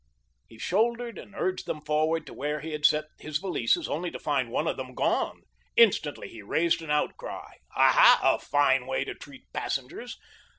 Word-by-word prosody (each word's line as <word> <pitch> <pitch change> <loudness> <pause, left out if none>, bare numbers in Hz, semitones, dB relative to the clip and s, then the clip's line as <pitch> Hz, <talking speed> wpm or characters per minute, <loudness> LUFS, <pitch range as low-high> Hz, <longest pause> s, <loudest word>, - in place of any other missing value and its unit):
He 115 - -16
shouldered 235 - 0
and 205 - -13
urged 185 0 -2
them 150 0 -5
forward 155 +2 +1
to - - -10
where 150 +2 -3
he 160 +2 -6
had 150 -1 +4
set 150 0 0
his 155 -1 -2
valises, 175 -10 0
only 175 +4 -2
to - - -7
find 140 -5 -1
one 120 - -1
of - - 0
them 130 -1 -7
gone. - - 0 0.3
Instantly - - +3
he 110 - -11
raised 165 +12 +1
an 160 - -9
outcry. 150 0 -3 0.2
Aha, - - +7
a - - +4
fine 135 -3 +2
way 130 - 0
to - - -5
treat 140 -2 -13
passengers! 140 - -4
150 Hz, 180 wpm, -27 LUFS, 135-170 Hz, 0.3 s, Aha